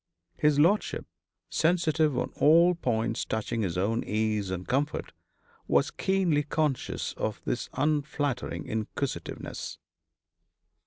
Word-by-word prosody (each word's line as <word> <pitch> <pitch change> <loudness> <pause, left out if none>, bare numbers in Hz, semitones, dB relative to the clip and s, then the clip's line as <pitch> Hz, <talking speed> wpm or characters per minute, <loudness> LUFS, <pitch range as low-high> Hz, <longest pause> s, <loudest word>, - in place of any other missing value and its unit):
His 150 -1 +3
lordship, 175 +8 +2 0.4
sensitive 160 -4 +2
on - - -1
all 170 +4 +6
points 115 -8 -1
touching 110 +1 -2
his 90 -4 -1
own 110 +5 +1
ease 105 -2 0
and 90 -1 -4
comfort, 140 +4 -1 0.5
was - - +3
keenly 185 -6 +1
conscious 150 -2 -1
of 110 - -2
this 120 - -2
unflattering 145 -2 -1
inquisitiveness. 110 +5 -4
140 Hz, 105 wpm, -28 LUFS, 110-155 Hz, 0.5 s, all